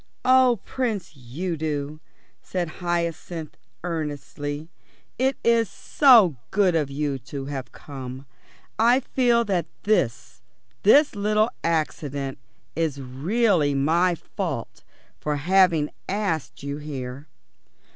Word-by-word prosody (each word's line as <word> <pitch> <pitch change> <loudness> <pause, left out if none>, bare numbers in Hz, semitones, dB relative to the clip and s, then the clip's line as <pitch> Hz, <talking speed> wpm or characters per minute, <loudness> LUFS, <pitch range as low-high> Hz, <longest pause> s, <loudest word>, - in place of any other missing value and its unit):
"Oh, 255 -3 +5
Prince 215 - -3
Udo," 150 +2 -4 0.4
said 180 -2 -3
Hyacinth 170 -2 -3 0.3
earnestly, 150 -2 -4 0.5
"it 265 +1 +2
is 230 -3 +3
so 225 - +5
good 195 -3 +3
of 155 -4 +1
you 140 -1 -2
to 135 +2 -7
have 135 -3 -5
come. 130 -1 -8 0.5
I 240 +4 +5
feel 240 -2 +2
that 185 -5 0 0.2
this 190 - 0 0.4
this 290 +8 +6
little 215 +2 +2
accident 145 -4 -2 0.4
is 160 -4 -1
really 150 - +1
my 170 +6 +3
fault - - -5 0.4
for 150 -1 -1
having 170 0 +3 0.2
asked 190 -9 -2
you 140 0 -3
here." 140 -1 -6
165 Hz, 105 wpm, -24 LUFS, 145-205 Hz, 0.5 s, this